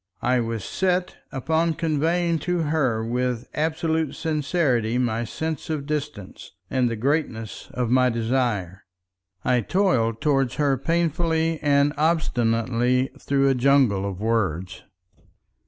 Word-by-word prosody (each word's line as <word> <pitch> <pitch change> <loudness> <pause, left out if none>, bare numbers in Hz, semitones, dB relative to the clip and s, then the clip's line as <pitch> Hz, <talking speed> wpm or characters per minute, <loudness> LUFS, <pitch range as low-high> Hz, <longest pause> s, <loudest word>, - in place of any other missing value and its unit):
I 125 +1 +2
was 115 -3 -3
set 185 -1 -1
upon 160 +4 0
conveying 165 +1 0
to 175 -2 +1
her 135 -8 0
with 125 0 -2
absolute 160 -1 -1
sincerity 145 -7 0
my 120 -2 0
sense 160 +6 -4
of 150 -3 -2
distance, 150 -9 -5 0.2
and 125 -2 +2
the 115 - -2
greatness 115 -3 -2
of 125 -2 -1
my 130 0 +4
desire. 115 -6 -1 0.6
I 125 -1 +3
toiled 115 - +1
toward 135 -4 +1
her 145 -3 +1
painfully 165 +2 0
and 145 0 +3
obstinately 125 -5 +1
through 140 0 +1
a - - +4
jungle 125 -7 +3
of 95 -2 -7
words. 95 -6 -1
135 Hz, 125 wpm, -24 LUFS, 115-160 Hz, 0.6 s, my